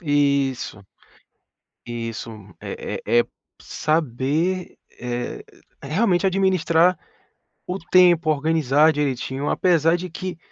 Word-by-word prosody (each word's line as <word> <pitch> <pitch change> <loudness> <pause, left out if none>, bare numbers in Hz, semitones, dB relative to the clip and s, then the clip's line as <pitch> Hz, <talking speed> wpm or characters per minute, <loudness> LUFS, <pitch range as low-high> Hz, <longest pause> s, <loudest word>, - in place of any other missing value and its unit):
Isso. 140 - 0 1.0
Isso, 115 -1 -5 0.3
eh - - -5
eh 120 - +3
eh, - - 0 0.4
saber, 155 +4 -1 0.2
eh, 120 0 -4 0.4
realmente 180 +5 +1
administrar 185 -2 +3 0.7
o 185 +2 -3
tempo, 175 -2 +4
organizar 155 0 +3
direitinho, 135 -1 -2
apesar 170 -2 +3
de 180 +1 -6
que, 180 +1 -6
155 Hz, 90 wpm, -22 LUFS, 135-175 Hz, 1.0 s, tempo